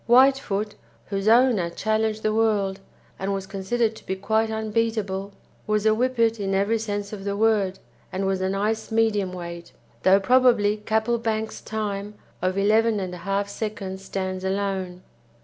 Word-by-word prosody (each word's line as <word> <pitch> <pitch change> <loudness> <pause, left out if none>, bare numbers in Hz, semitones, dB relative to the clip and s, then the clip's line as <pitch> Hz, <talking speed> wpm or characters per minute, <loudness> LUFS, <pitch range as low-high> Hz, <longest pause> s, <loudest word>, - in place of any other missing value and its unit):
Whitefoot, 240 -5 +4 0.4
whose 195 +1 -1
owner 230 -6 +4
challenged 220 +3 -1
the 215 - +1
world, 205 -3 +1 0.4
and 195 +1 -1
was 195 -1 -4
considered 215 +4 -1
to - - -14
be 190 - -1
quite 220 +3 +1
unbeatable, 215 -3 -1 0.4
was 215 0 +1
a 220 - +6
Whippet 230 -1 +1
in 195 -1 -1
every 205 +4 +2
sense 205 -1 -3
of 200 -2 -6
the 200 0 -2
word, 205 -4 +2 0.3
and 190 +1 -2
was 190 -1 0
a 190 - 0
nice 210 +4 -1
medium 220 -4 +2
weight, 170 -1 -8 0.3
though 190 +1 +5
probably 235 -2 +4
Capplebank's 220 0 -1
time 210 -1 -4 0.3
of 185 +1 0
11 215 +2 +3
1/2 195 +1 -2
seconds 200 -2 -5
stands 185 -1 -3
alone. 190 -2 -2
205 Hz, 150 wpm, -24 LUFS, 195-220 Hz, 0.4 s, a